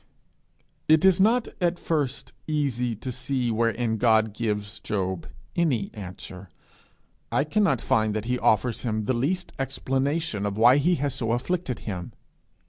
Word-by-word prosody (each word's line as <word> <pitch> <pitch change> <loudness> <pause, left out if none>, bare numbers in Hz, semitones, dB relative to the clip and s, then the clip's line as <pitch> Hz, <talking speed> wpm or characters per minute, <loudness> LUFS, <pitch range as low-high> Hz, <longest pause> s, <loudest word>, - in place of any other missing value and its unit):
It 155 +3 +5
is 190 -1 +5
not 230 +4 +3
at 175 0 +2
first 150 -7 -2
easy 130 -6 0
to 125 +5 -5
see 130 -1 -1
wherein 115 0 0
God 110 -2 +3
gives 105 -2 -3
Job 95 -4 -2 0.3
any 135 - +1
answer; 95 -1 -8 0.8
I 140 - +2
cannot 155 - +1
find 110 -1 +1
that 110 0 -2
he 125 +1 -1
offers 110 +2 +2
him 110 -3 -2
the 130 - +1
least 160 +10 -1
explanation 135 -2 -1
of 100 0 -4
why 120 +4 +7
he 170 +5 +3
has 145 -3 -1
so 115 -1 -1
afflicted 130 +2 -2
him. 90 -5 -5
125 Hz, 145 wpm, -26 LUFS, 110-145 Hz, 0.8 s, why